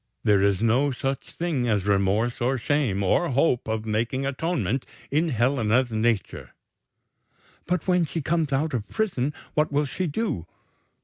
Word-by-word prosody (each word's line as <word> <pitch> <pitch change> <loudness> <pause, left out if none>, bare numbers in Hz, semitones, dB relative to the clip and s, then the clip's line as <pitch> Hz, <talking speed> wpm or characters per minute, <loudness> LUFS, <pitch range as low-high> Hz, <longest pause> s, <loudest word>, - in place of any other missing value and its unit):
There 100 -2 +4
is 100 +1 +2
no 125 +6 +3
such 135 +1 -3
thing 150 -8 -1
as 105 -3 +1
remorse 105 +4 +1
or 130 +2 +1
shame, 125 -7 0
or 170 - +2
hope 130 -2 +1
of 110 0 -2
making 115 +5 -1
atonement, 135 - -1 0.3
in 160 +4 +2
Helena's 120 -1 +2
nature." 110 -2 -1 1.1
"But 180 0 -1
when 180 -2 +3
she 165 - -4
comes 155 0 0
out 150 +3 0
of 110 -5 -3
prison, 160 - -1 0.2
what 150 -1 +1
will 145 +1 +1
she 180 +6 -3
do?" 150 - -2
130 Hz, 150 wpm, -25 LUFS, 110-150 Hz, 1.1 s, There